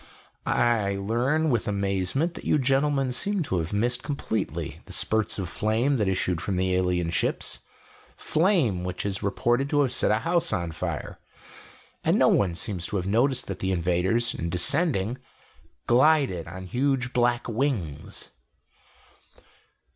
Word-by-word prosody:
I 110 -5 +2
learn 125 +10 +1
with 120 -3 0
amazement 100 - 0
that - - -9
you - - +2
gentlemen 135 0 +1
seem 195 +8 -1
to 95 - -1
have 80 +1 -3
missed 120 +4 0
completely 110 - -3
the - - -9
spurts 110 -1 0
of 95 -3 -3
flame 115 +9 +1
that 105 -4 0
issued 90 -2 0
from 95 0 -2
the 95 0 +1
alien 90 -2 +1
ships - - -1 0.6
flame 155 - +1
which 90 +1 -4
is 95 -2 -2
reported 120 +7 0
to 145 -1 +3
have 135 -3 +1
set - - +2
a 105 - +3
house 170 +6 +1
on 85 -1 -1
fire. - - -5 0.8
And - - +3
no - - +5
one 90 -4 +2
seems 90 -1 -3
to - - -5
have 90 -2 -1
noticed 120 +5 +2
that 95 -2 -6
the 95 - -1
invaders, 95 +8 +1
in 85 - -3
descending, 125 - +1 0.7
glided 130 - +3
on 95 +2 -8
huge 125 +4 0
black 120 0 +1
wings." 110 - -3
110 Hz, 150 wpm, -26 LUFS, 95-135 Hz, 0.8 s, no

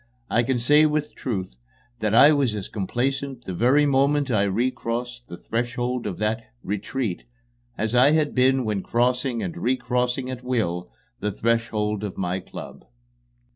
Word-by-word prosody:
I 115 - +4
can 125 +1 0
say 150 +6 +5
with 150 0 -1
truth 95 - -4 0.4
that 110 -1 +1
I 145 +6 +8
was 135 -7 +2
as 100 -3 -5
complacent 130 +5 -2
the 95 - -4
very 130 +10 +4
moment 140 0 +2
I 100 -3 +3
recrossed 120 +3 -2
the 85 - -8
threshold 120 +2 -2
of 95 - -4
that 110 +2 -1 0.2
"retreat" 105 +1 -3 0.5
as 110 +1 -1
I 125 +3 +6
had 150 -1 +2
been 130 0 +3
when 105 -3 -1
crossing 125 +2 0
and 170 - -4
recrossing 125 -2 0
at 125 -1 -7
will 90 -9 -1 0.3
the 105 +1 -1
threshold 105 -1 0
of 100 -3 -5
my 90 0 -1
club. - - -10
120 Hz, 155 wpm, -24 LUFS, 105-130 Hz, 0.5 s, I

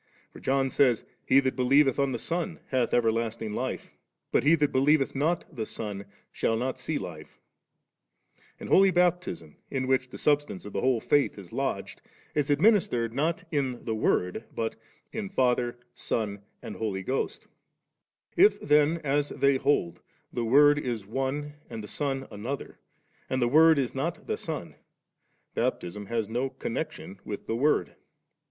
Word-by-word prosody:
For - - -11
John 135 0 +1
says, 125 -5 +3
* - - -43
He 135 - +7
that 130 -1 -1
believeth 135 +2 +4
on 140 -1 +2
the 120 - -2
Son, 170 +5 -3
hath 130 -3 +1
everlasting 115 -1 0
life; - - -4 0.4
but - - +3
he 155 +4 +6
that 150 -3 +1
believeth 135 +1 +3
not 160 +5 0
the 110 -3 -3
Son, 100 -2 -5 0.3
shall 115 - 0
not 130 +3 -2
see 155 - -2
life 80 - -8 0.6
\' - - -36
And - - -7
Holy 195 0 +6
Baptispo, 180 - 0 0.2
in 130 -2 -1
which 130 0 +1
the - - -9
substance 145 -10 0
of 105 - -8
the - - -1
whole 125 -3 +2
faith 145 -1 +2
b 100 - -9
lodged, - - -3 0.3
is 150 -1 0
administered 145 - +3
not 165 +8 0
in 135 -5 -2
the 115 - -1
Word, 110 -1 0
but 115 -1 -2 0.4
in 215 -3 -4
Father, 125 -7 +1 0.2
Son, 105 -3 -2 0.2
and - - -7
Holy 100 -4 -2
Ghost 130 +7 -2 0.9
If 400 +5 +5
then, 150 +2 +3
as 145 0 +1
they 140 0 +2
hold, 130 -11 0 0.3
the 120 - -1
Word 145 +5 +6
is 120 -7 -3
one 135 +6 -3 0.2
and 115 -2 -6
the - - -7
Son 135 0 -2
another, 115 +7 -6 0.5
and 130 - 0
the 120 - +2
Word 160 +4 +6
is 130 -3 0
not - - -3
the - - -2
Son, - - -5 0.8
Baptism 100 +4 -2
has 115 -1 -1
no 120 +5 -1
connec - - -3
tion - - -11
with - - -6
the 115 - -2
Word. 145 +6 +2
130 Hz, 165 wpm, -28 LUFS, 115-145 Hz, 0.9 s, He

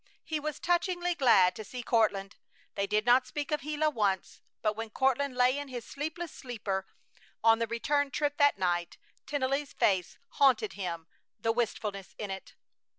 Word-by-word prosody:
He 315 -1 -2
was 300 0 -4
touchingly 350 0 +1
glad 230 - +5
to 220 - -6
see 245 +4 -7
Courtland. 205 -4 +1 0.4
They 200 0 -1
did 210 +1 +1
not 250 +1 +5
speak 295 +1 -4
of 300 -1 0
Gila 305 +1 0
once, 200 -7 -1 0.2
but 215 -1 +1
when 225 0 -5
Courtland 265 +3 +1
lay 250 +1 +4
in 285 - -5
his 245 -3 -6
sleepless 315 +3 -5
sleeper 200 -6 -4 0.6
on 225 0 +6
the 230 - 0
return 285 +5 0
trip 290 +1 -1
that 285 -5 +4
night 175 -2 -1 0.3
Tennelly's 280 0 -1
face 185 -4 +1
haunted 235 -7 +3
him, 170 -4 -4 0.3
the 225 - +1
wistfulness 210 -4 -3
in 205 -2 -4
it. 190 0 -8
240 Hz, 165 wpm, -30 LUFS, 205-285 Hz, 0.6 s, on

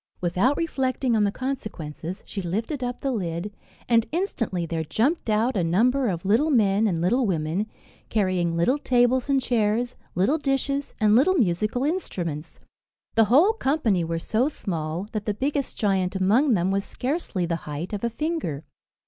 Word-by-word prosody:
Without 185 +11 +1
reflecting 260 -6 0
on 210 -1 +3
the 200 - +1
consequences, 190 - -5
she 200 - -5
lifted 225 - -3
up 245 0 -4
the 275 - 0
lid, 185 -2 -3 0.3
and 230 -1 +3
instantly 240 - -1
there 165 -1 -2
jumped 235 - 0
out 220 +4 +2
a 185 - +1
number 245 +10 +2
of 175 -3 -3
little 230 +11 +3
men 215 -5 +3
and 170 -5 0
little 230 +8 +2
women, 170 +3 -1 0.4
carrying 185 -5 +1
little 255 +13 +2
tables 250 0 +2
and 275 -1 +4
chairs, 235 +1 0 0.2
little 205 - +2
dishes, 275 0 -1
and 215 -1 +4
little 310 +10 +4
musical 215 - +1
instruments. 175 - -3 0.5
The 225 - +5
whole 300 - +5
company 265 - +1
were 165 0 -2
so 225 - +1
small, 170 - -4
that 215 -3 -4
the 210 - -1
biggest 280 +3 -2
giant 195 -4 +1
among 220 +8 +3
them 180 +1 +1
was 195 0 0
scarcely 250 - -2
the 170 -1 -1
height 150 +6 -5
of 205 - -4
a 235 - +1
finger. 235 - -3
215 Hz, 165 wpm, -25 LUFS, 180-260 Hz, 0.5 s, The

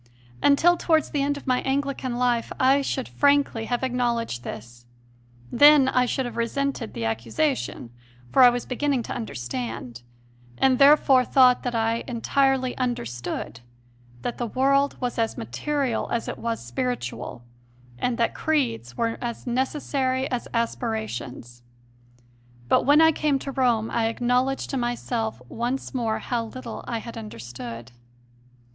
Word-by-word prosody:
Until 340 +5 +5
towards 320 -3 +1
the 290 - 0
end 285 +1 0
of - - -11
my 255 -2 +1
Anglican 270 -2 -2
life 245 -2 +1
I 270 +2 +4
should 265 -1 -2
frankly 285 -5 +2
have 245 +2 -2
acknowledged 240 - -1
this; 120 +1 -9 0.6
then 290 -2 +7
I 250 -1 +2
should 265 +1 -1
have 240 - -6
resented 260 +1 -2
the 115 - -3
accusation, 115 +2 -2 0.4
for - - +5
I 250 - +10
was 245 0 -2
beginning 265 -1 -1
to - - -5
understand 120 - -5 0.6
and, 260 -1 +3
therefore, 275 -2 +6
thought 250 -1 +5
that 245 -2 -3
I 225 +1 0
entirely 260 +1 +1
understood 120 - -3 0.6
that 240 - -4
the 240 - -1
world 275 +4 +2
was 245 -2 -3
as 225 -1 0
material 245 - -2
as 235 - -2
it - - -5
was 230 - -3
spiritual, 120 0 -4 0.6
and 245 - 0
that 230 - +1
creeds 235 - -1
were 230 -1 -1
as 235 -1 -5
necessary 260 +1 -1
as 245 -1 -2
aspirations. 220 - -3 1.1
But - - +3
when 295 +2 +6
I 320 0 +7
came 300 -3 +1
to 275 +1 -6
Rome 240 -4 +1
I 225 -1 +1
acknowledged 250 +3 0
to 270 - -1
myself 235 - -2
once 240 - -3
more 230 -4 0
how 235 -2 -2
little 235 0 -8
I 235 - -2
had 230 +1 -8
understood. 120 - -8
245 Hz, 145 wpm, -25 LUFS, 220-270 Hz, 1.1 s, I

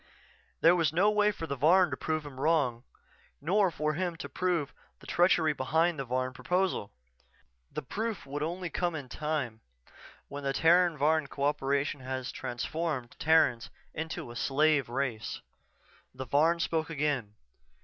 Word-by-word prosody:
_" - - -30 0.6
There 170 +2 +6
was 165 -5 +2
no 190 +6 +3
way 210 0 +3
for 165 - -6
the 140 - -3
Varn 170 +5 +4
to - - -1
prove 155 +2 -2
him 135 -3 -9
wrong, 140 -6 +1 0.6
nor 190 +6 +2
for 155 -2 -1
him 175 +1 -2
to 160 - -7
prove 175 -6 -1 0.3
the - - -16
treachery 170 -3 +3
behind 160 +4 +1
the 135 - -3
Varn 130 +1 -1
proposal. 180 - -1 0.8
The - - -5
proof 220 - -4
would 140 +2 -4
come 150 - 0
only 175 0 -5 0.3
with 130 - -19
time, 145 -6 -3 0.7
when 140 0 -7
the 135 0 0
Terran 170 +2 +4
Varn 155 +1 +2
co 140 - -5
operation 140 0 0
had 130 0 -4
transformed 130 +1 -3
Terrans 155 -7 +3 0.2
into 160 -4 -5
a - - -10
slave 140 +1 +2
race. 120 -4 -3 0.8
The 130 +1 -5
Varn 155 +7 +3
spoke 165 -1 -1
again. 140 -9 -1
150 Hz, 160 wpm, -30 LUFS, 135-165 Hz, 0.8 s, There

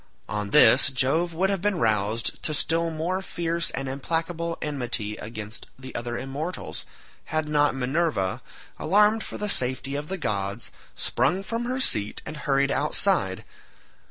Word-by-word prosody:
On 105 -1 -3
this, 150 +2 +7
Jove 140 +7 +1
would 190 +4 +1
have 195 -3 -1
been 205 -1 +1
roused 110 -3 +1
to 155 - 0
still 165 +3 +2
more 165 +4 -2
fierce 170 -2 -2
and 135 0 -3
implacable 165 +5 -2
enmity 120 -7 0
against 110 -1 -7
the 130 0 -9
other 120 0 -3
immortals, 145 +8 -5 0.4
had 155 -1 -1
not 145 -2 +3
Minerva, 130 - 0 0.4
alarmed 210 +6 +4
for - - -6
the 210 - -2
safety 130 -5 0
of 145 +1 -3
the 190 - -3
gods, 100 - -2 0.2
sprung 190 +2 +1
from 230 +4 -3
her 255 +2 -1
seat 105 - +1
and 150 - -6
hurried 140 -1 +1
outside. 150 - +1
150 Hz, 150 wpm, -26 LUFS, 120-170 Hz, 0.4 s, this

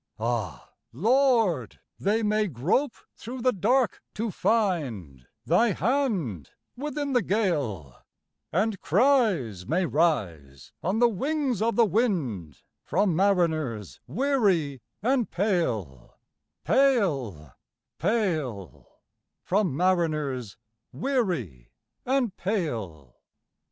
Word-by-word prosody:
Ah, 115 -4 -3 0.2
Lord! 225 - +2 0.2
they 215 +3 +1
may 210 0 +1
grope 180 - 0 0.2
through 245 +1 -7
the 255 - +4
dark 235 +5 +1
to 220 0 -2
find 130 - -1 0.2
Thy 200 - +3
hand 185 - -1 0.3
within 290 +1 -3
the 245 - +4
gale; 145 - -1 0.6
And 200 +5 0
cries 190 - +2
may 175 +7 +1
rise 95 - -1
on 190 +5 0
the 240 +1 +5
wings 265 - -1
of 230 +1 +1
the 235 - +5
wind 170 - -1 0.2
From 195 -5 +1
mariners 160 - 0
weary 185 - +1 0.2
and 250 -1 +1
pale, 120 - -2 0.5
pale, 140 - +1 0.5
pale 160 - -2 0.4
From 185 -7 0
mariners 155 - 0 0.3
weary 175 - -2 0.4
and 255 -6 +1
pale! 110 - -4
180 Hz, 95 wpm, -26 LUFS, -, 0.6 s, the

